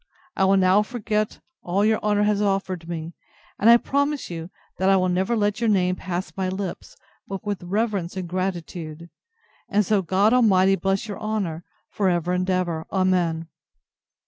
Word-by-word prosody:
I 190 - +2
will 195 +1 +4
now 190 +2 +4
forget 215 -2 -2 0.2
all 195 +4 0
your 220 0 +3
honour 210 -1 +2
has 210 -1 +2
offered 190 -4 -1
me: 165 0 -5 0.5
and 220 - +5
I 235 - +9
promise 285 -1 -1
you, 165 0 -6 0.3
that 190 +1 +3
I 195 - +5
will 185 0 +1
never 190 +6 +1
let 205 0 0
your 230 - +2
name 185 -3 +2
pass 185 0 -4
my 190 -1 -1
lips, 190 -1 -5 0.3
but 195 +2 -6
with 205 -2 -3
reverence 195 -1 -2
and 185 -2 -4
gratitude: 170 -3 -4 0.6
and 205 0 +2
so 205 +1 +2
God 195 +5 +2
Almighty 195 -6 +4
bless 195 +2 -1
your 205 - -6
honour, 200 -7 -3 0.3
for 200 -2 +1
ever 175 0 0
and 185 +1 -1
ever! 175 -3 -1
Amen. 180 -4 +1
190 Hz, 170 wpm, -24 LUFS, 180-210 Hz, 0.6 s, I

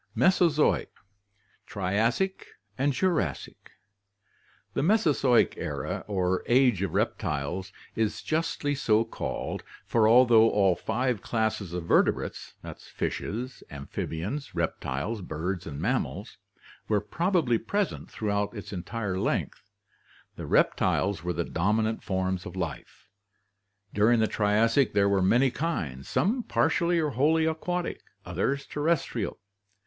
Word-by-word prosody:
Mesozoic 170 -5 +3 0.8
Triassic 110 - 0 0.3
and 140 +6 +1
Jurassic. 140 - -2 0.5
— - - -37
The - - 0
Mesozoic 150 - +3
era - - -4
or 95 -2 0
Age 125 -5 +4
of 95 -4 -2
Reptiles 75 +6 -2 0.2
is 110 -2 -1
justly 155 -2 -1
so 115 -5 +2
called, 115 - -4 0.2
for 110 -2 +3
although 115 -2 +6
all 95 -3 +3
five 120 +1 -1
classes 110 -5 -1
of 90 -1 -4
vertebrates - - +1 0.4
(fishes, 125 +4 -4
amphibians, 80 - -5
reptiles, 75 - -2
birds, 90 +2 -4
mammals) 75 - -3 0.5
were 105 -1 +2
probably 155 - +1
present 200 - -2
throughout 105 0 -2
its 105 - -8
entire 95 +1 -3
length, 100 - -2 0.7
the - - -7
reptiles 95 -3 +2
were 90 0 -1
the 85 +1 -2
dominant 110 +5 0
forms 95 -2 -2
of 90 - -9
life. 85 +1 -6 0.9
During 110 +3 +4
the 110 - +4
Triassic 110 +5 +2
there 100 0 +3
were 100 -1 +2
many 120 +8 +4
kinds, 80 - -3
some 235 +7 +1
partially 175 -6 +1
or 155 -3 +1
wholly 155 +6 +2
aquatic, 175 +2 -2 0.2
others 100 +11 -1
terrestrial. 145 -8 -1
110 Hz, 115 wpm, -27 LUFS, 95-140 Hz, 0.9 s, although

